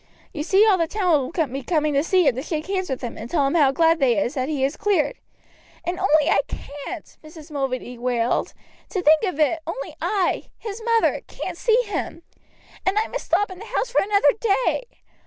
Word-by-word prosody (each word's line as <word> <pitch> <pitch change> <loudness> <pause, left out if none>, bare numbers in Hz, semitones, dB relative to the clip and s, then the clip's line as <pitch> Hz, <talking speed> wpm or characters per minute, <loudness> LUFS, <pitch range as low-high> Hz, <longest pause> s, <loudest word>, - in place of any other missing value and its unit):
You 300 - -4
see 385 +7 +4
all 400 -4 +4
the 330 - +1
town 330 -9 +1
will 335 -2 +1
be 270 +2 -5
coming 305 +1 0
to 280 +1 +2
see 360 -1 +3
him - - +4
to 255 - -4
shake 310 +1 -3
hands 375 -2 -2
with 265 - -3
him 240 -3 -6
and 230 - -7
tell 295 -5 +2
him 275 - 0
how 295 -6 +4
glad 325 +3 +3
they 250 -5 +3
is 235 +6 0
that 260 -1 -2
he 285 -4 -1
is 275 +3 0
cleared." 410 +2 +1 0.7
"And 355 +1 -2
only 310 -5 +3
I - - +4
can't!" 290 +4 -8
Mrs. 310 0 -13
Mulready 255 -3 -3
wailed. 240 -1 0 0.3
"To 375 -4 -2
think 310 0 +6
of 365 -6 -3
it, 315 +2 +2
only 455 +10 -5
I, 395 -4 0
his 435 0 -7
mother, 460 -1 +2
can't - - -6
see 465 0 +3
him! 375 -4 -4 0.6
And 380 +2 +1
I 435 - +1
must - - -5
stop 410 -1 +1
in 370 - -9
the 435 - -9
house 485 +1 -2
for - - +3
another 400 -7 +3 0.3
day! - - 0
320 Hz, 215 wpm, -23 LUFS, 275-385 Hz, 0.7 s, think